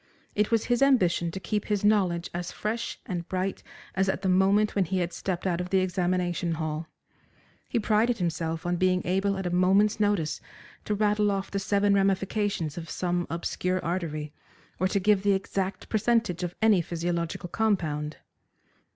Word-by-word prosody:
It 210 0 +1
was 225 -2 +2
his 245 0 +1
ambition 185 -11 +3
to 190 - -5
keep 210 +2 -2
his 205 -1 0
knowledge 185 -5 +2
as 175 0 -4
fresh 225 +2 -3
and 175 -6 -4
bright 185 +1 -2 0.3
as 190 0 +1
at 190 - -2
the 190 - +1
moment 195 +3 +3
when 195 -2 +2
he 190 +3 -1
had 175 -1 -1
stepped 185 -1 -3
out 180 -2 0
of 180 - -5
the 190 - +3
examination 180 -2 0
hall. 155 0 -3 0.8
He 245 - 0
prided 225 +2 +2
himself 165 -2 -2
on 175 0 0
being 185 0 +2
able 195 +2 +1
at 190 - -4
a 175 - -1
moment's 195 +4 +3
notice 205 -7 +1 0.4
to 210 - 0
rattle 210 0 +2
off 195 -1 -2
the 200 - -1
seven 200 +1 +2
ramifications 195 -3 0
of 165 - -9
some 175 -1 -1
obscure 180 +2 -1
artery, 155 -4 -3 0.5
or 185 - +3
to 200 +1 0
give 205 0 +3
the 200 0 +3
exact 190 0 -2
percentage 220 -4 +1
of 175 -1 -3
any 210 -5 +5
physiological 170 +1 -3
compound. 160 -9 -1
185 Hz, 175 wpm, -27 LUFS, 175-205 Hz, 0.8 s, any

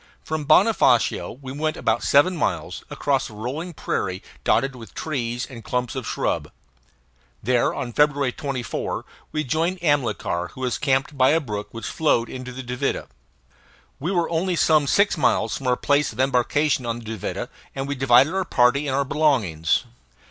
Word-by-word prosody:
From 155 -1 -3
Bonofacio 155 - +3
we 130 - -6
went 155 +3 -2
about - - +1
seven 145 +6 +4
miles, 100 - -2
across - - 0
a - - -13
rolling 145 +11 -5
prairie 95 -8 -2 0.2
dotted 135 +3 +2
with 115 -5 -12
trees 120 -6 -2
and 120 -4 -10
clumps 125 -1 -2
of 130 -3 -5
shrub. - - -1 0.9
There, 125 +2 +2
on 125 -4 -5
February 145 -2 +2
24, 130 -2 -4 0.3
we 155 - -1
joined 165 +7 0
Amilcar, 115 - 0
who 130 - -10
was 125 -1 -1
camped 135 0 0
by 130 - +6
a 160 - +4
brook 105 -8 -5
which 115 -1 -8
flowed 135 -7 +1
into 130 0 -7
the 130 +1 -7
Duvida. 125 0 -2 0.9
We 165 +7 -2
were 175 -3 +1
only 175 +2 0
some 155 -3 +3
six 200 +1 +3
miles - - +2
from 135 - -5
our 125 - +3
place 145 0 +2
of 115 - -13
embarkation 135 +2 +2
on 115 0 -1
the 120 - -10
Duvida, 110 -3 -4 0.3
and 135 0 -3
we 140 - -1
divided 135 +3 +4
our 190 0 +1
party 140 -2 +2
and 135 - 0
our 140 0 +1
belongings. 115 - +1
135 Hz, 170 wpm, -23 LUFS, 120-150 Hz, 0.9 s, by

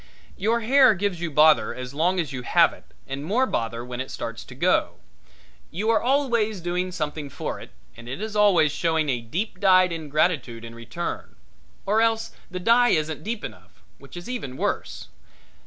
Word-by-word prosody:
Your 225 +4 0
hair 255 0 +5
gives 185 -2 -2
you 170 - -2
bother 155 +1 +4
as 130 +1 -7
long 175 +5 +1
as 155 -6 -2
you 125 - -4
have - - +4
it - - -16 0.2
and 135 +1 -5
more 220 +11 +2
bother 115 - -3
when 125 0 -5
it 130 - -6
starts 115 -1 -6
to - - -12
go. - - +1 0.7
You 210 +7 0
are 225 - +3
always 235 -6 +1
doing 180 +1 -2
something 150 -4 -4
for - - -5
it - - -11 0.3
and 120 +1 -11
it 130 - -5
is 215 0 -5
always 185 -8 +4
showing 160 0 0 0.2
deep 185 - -3
dyed 185 -2 +5
ingratitude 150 -7 -1
in 115 - -9
return; 115 +9 -6 0.5
or 210 +3 +2
else 225 0 +1 0.2
the 180 0 -5
dye 235 +5 +4
isn't 155 -4 0
deep 225 +1 -4
enough, - - -11 0.2
which - - -12
is 175 - -8
even 200 - -5
worse. - - -3
175 Hz, 180 wpm, -24 LUFS, 145-215 Hz, 0.7 s, hair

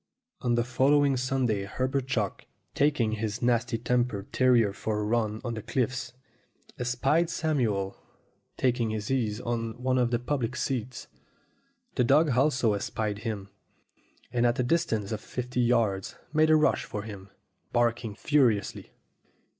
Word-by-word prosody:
On 120 -2 +1
the 120 - +2
following 135 +3 +3
Sunday 125 -5 0
Herbert 130 +5 -2
Chalk, 110 -6 -2 0.3
taking 140 -6 +2
his 110 +1 -3
nasty 120 -1 +1
tempered 120 -3 -1
terrier 120 -6 +4
for 105 +1 -2
a - - -1
run 110 -1 0
on 120 -2 -3
the 110 - -5
cliffs, 125 +2 -2 0.7
espied 135 +7 +1
Samuel 125 - 0 0.6
taking 120 -3 +1
his 110 +1 -3
ease 115 -5 0
on 115 -1 -3
one 130 0 +1
of 120 -1 +2
the 120 - +1
public 125 0 -2
seats. 130 -2 -3 0.9
The - - +2
dog 145 +4 +4
also 125 -3 +2
espied 105 +1 -2
him, 105 -3 -4 0.8
and 120 0 +2
at 120 - +1
a 125 - +1
distance 120 - 0
of 110 -1 -3
fifty 125 0 -3
yards 115 -5 +1 0.2
made 155 0 +4
a 155 - +7
rush 155 0 +3
for 105 - -5
him, 100 -3 -9 0.4
barking 120 -3 0
furiously. 125 -6 +1
120 Hz, 145 wpm, -28 LUFS, 110-130 Hz, 0.9 s, a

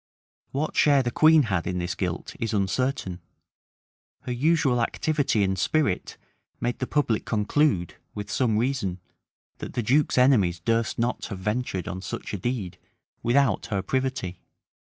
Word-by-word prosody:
What 150 +3 -2
share 140 -3 +5
the 120 - -1
queen 155 +3 +6
had 95 -8 -1
in 90 -1 -1
this 90 0 -2
guilt 90 -2 -4
is 115 -1 -1
uncertain; 100 -2 -1 1.0
her - - -5
usual 135 -1 +2
activity 140 -3 +1
and 95 -1 0
spirit 145 0 0 0.4
made 120 0 -2
the 130 - -2
public 135 -7 +1
conclude, 105 - +1 0.2
with 105 -1 -5
some 115 -5 +1
reason, 110 -7 -1 0.6
that - - -7
the 120 - -1
duke's 135 +6 +2
enemies 110 -10 +4
durst 115 +5 0
not 120 +1 -1
have 100 - -6
ventured 105 -1 -2
on 95 -1 -4
such - - -6
a - - -1
deed 105 -4 -3 0.4
without 130 0 +2
her 100 -3 -2
privity. 130 -6 -2
115 Hz, 150 wpm, -26 LUFS, 95-135 Hz, 1.0 s, queen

